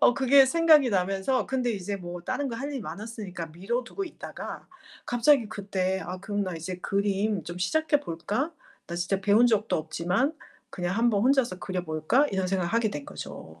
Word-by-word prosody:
어 245 - +6
그게 270 0 +6
생각이 310 -4 +5
나면서 195 +6 +1
근데 255 -2 0
이제 200 0 -3
뭐 175 -1 -7
다른 280 +9 -2
거 230 - -4
할 280 +3 -4
일이 270 -3 -4
많았으니까 205 -5 -6
미뤄 225 +9 -2
두고 390 +10 -4
있다가 340 - -8 0.4
갑자기 245 0 +4
그때 190 -2 -2
'아 180 +2 -5
그럼 205 +1 -2
나 185 -2 -4
이제 170 +3 -5
그림 200 0 0
좀 175 +1 -7
시작해 305 +9 +2
볼까? 210 - -2 0.3
나 170 - -6
진짜 180 +3 -1
배운 210 +4 +5
적도 220 -1 +2
없지만 180 - 0 0.4
그냥 180 +1 -2
1 235 +1 +4
번 205 -2 +1
혼자서 250 -7 +2
그려 185 -2 -3
볼까?' 160 - +2
이런 190 -1 0
생각을 185 -2 -1
하게 230 -2 +2
된 145 -5 -5
거죠. 80 -10 -9
205 Hz, 355 characters per minute, -27 LUFS, 180-250 Hz, 0.4 s, 어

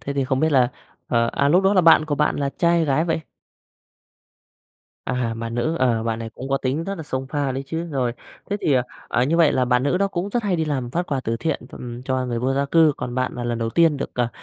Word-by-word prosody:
thế 140 - -4
thì 140 -1 0
không 130 0 0
biết 160 0 +2
là 125 -3 +4 0.4
ờ, 115 -1 +2
à, 140 - +2
lúc 180 +6 +4
đó 195 - +4
là 185 - +6
bạn 165 -2 +6
của 150 -2 -1
bạn 150 +1 +1
là 140 -1 -1
trai 170 - +3
hay 165 - +2
gái 150 +2 +1
vậy? 165 -1 -1 1.9
À, 125 -3 -1
bạn 115 0 -5
nữ, 140 +8 0
ờ, 120 -3 +2
bạn 115 -1 -2
này 115 -1 -6
cũng 130 +4 -8
có 135 - +2
tính 135 +6 -2
rất 195 - -3
là 165 - -7
xông 135 -3 -4
pha 140 -1 -1
đấy 135 +1 -3
chứ. 165 +4 -3
Rồi, 130 -4 0 0.4
thế 205 - +1
thì, 140 - +2 0.3
à, 120 - +2
như 155 +5 +1
vậy 165 -3 +5
là 130 - +2
bạn 125 0 +2
nữ 145 +6 +1
đó 200 0 +2
cũng 190 +1 -3
rất 240 +2 0
hay 195 -4 0
đi 160 - 0
làm 135 -5 -2
phát 175 +6 -2
quà 140 -5 -1
từ 115 +1 -1
thiện, 160 +8 -2
ừm, 120 0 -8
cho 130 -1 -1
người 120 -1 -2
vô 130 +3 0
gia 140 +1 +1
cư, 160 +1 +4
còn 120 - -5
bạn 130 0 -1
là 120 - -5
lần 120 -1 -2
đầu 115 -1 -2
tiên 165 +1 +3
được, 140 - -4
ờ, 120 -2 +1
135 Hz, 275 wpm, -22 LUFS, 125-160 Hz, 1.9 s, là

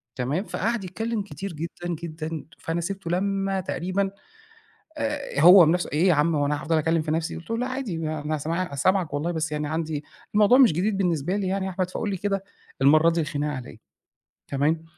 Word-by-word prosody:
تمام، 135 +9 -1
فقعد 225 0 -2
يتكلّم 220 +5 -3
كتير 195 -1 -7
جدًا، 170 +2 -5
جدًا 160 -2 -5
فأنا 165 +1 -2
سِبته 190 -1 -4
لمّا 195 +1 0
تقريبًا 185 +2 -1 0.9
آآ، 280 - -2
هو 175 +2 +9
بنفسُه 175 +3 +1
إيه 160 +6 +3
يا 180 - +5
عم 155 +2 +2
هو 145 -1 +1
أنا 145 -1 -1
هافضل 160 +2 +1
أكّلم 160 +1 +1
في 155 - -4
نفسي، 160 +1 -1
قُلت 170 - -11
له 230 - 0
لأ 250 - -1
عادي 255 -9 -3
أنا 155 -1 -2
سمع 165 +5 -1
أنا 170 - -5
سامعَك 180 +1 +1
والله 155 +4 -1
بس 160 -2 -2
يعني 150 0 -2
عندي، 155 -1 -3 0.3
الموضوع 210 +4 +6
مش 255 -8 +7
جديد 195 +6 0
بالنسبة 175 -1 0
لي 200 -2 -1
يعني 190 0 -1
يا - - -2
أحمد 185 0 -2
فقُل 210 +3 -3
لي 195 - -1
كده 195 +1 -2 0.4
المرّه 155 +4 +6
دي 170 0 0
الخناقة 150 -2 -2
على 125 -1 -7
إيه، - - -14 0.7
تمام، 150 +4 0
170 Hz, 205 wpm, -25 LUFS, 155-195 Hz, 0.9 s, هو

